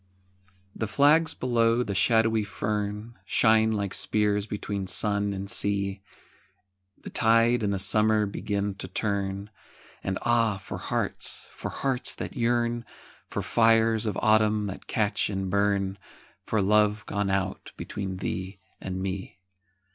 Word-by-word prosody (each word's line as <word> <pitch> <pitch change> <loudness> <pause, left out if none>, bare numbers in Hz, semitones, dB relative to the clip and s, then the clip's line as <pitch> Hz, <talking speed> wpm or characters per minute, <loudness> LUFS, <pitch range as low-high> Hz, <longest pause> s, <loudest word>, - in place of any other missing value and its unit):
THE 110 - -2
flags 155 +7 +4
below 120 -1 +2
the 100 - -4
shadowy 110 +2 +3
fern 105 +2 -4
Shine 110 -1 +3
like 100 -3 -2
spears 105 -1 0
between 100 -2 -4
sun 100 0 +1
and 100 0 -5
sea, 100 -1 +1 1.0
The - - -8
tide 115 +2 +3
and 105 -2 0
the 100 - 0
summer 105 +2 +4
begin 100 0 -2
to - - -4
turn, 100 -1 -3 0.5
And 95 0 -2
ah, 115 -3 +2
for 95 - -7
hearts, - - -2
for - - -6
hearts 135 -2 -1
that - - -6
yearn, 120 -1 0 0.4
For - - -4
fires 115 -1 +3
of 105 - -2
autumn 110 -1 +3
that 100 -1 -7
catch 105 -2 0
and 95 -2 -3
burn, 100 -1 +1 0.5
For 110 -3 +1
love 105 +1 +2
gone 100 -1 -2
out 95 -1 -2
between 95 -2 -5
thee 95 +1 -4 0.2
and 95 0 -4
me. 95 0 -5
105 Hz, 135 wpm, -27 LUFS, 100-115 Hz, 1.0 s, flags